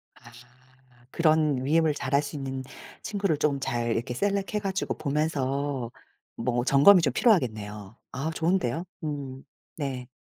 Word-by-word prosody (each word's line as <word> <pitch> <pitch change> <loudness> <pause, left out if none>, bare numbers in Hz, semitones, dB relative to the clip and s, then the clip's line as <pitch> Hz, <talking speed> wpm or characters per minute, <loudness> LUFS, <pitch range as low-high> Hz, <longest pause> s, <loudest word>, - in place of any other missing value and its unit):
아 120 -1 -16 0.8
그런 155 -5 +2
위임을 160 +1 +3
잘할 140 +1 +1
수 145 +1 -6
있는 135 -2 -4 0.4
친구를 200 -7 0
좀 145 -2 +1
잘 120 -3 -1
이렇게 120 +2 -2
셀렉해 200 - -1
가지고 195 -1 -2
보면서 140 -4 -1 0.4
뭐 120 0 -1
점검이 145 +8 +7
좀 155 - +1
필요하겠네요. 110 - 0
아 145 +5 -3
좋은데요. 165 -2 0 0.2
음 140 -3 -5 0.3
네. 135 -4 -4
140 Hz, 270 characters per minute, -27 LUFS, 130-160 Hz, 0.8 s, 점검이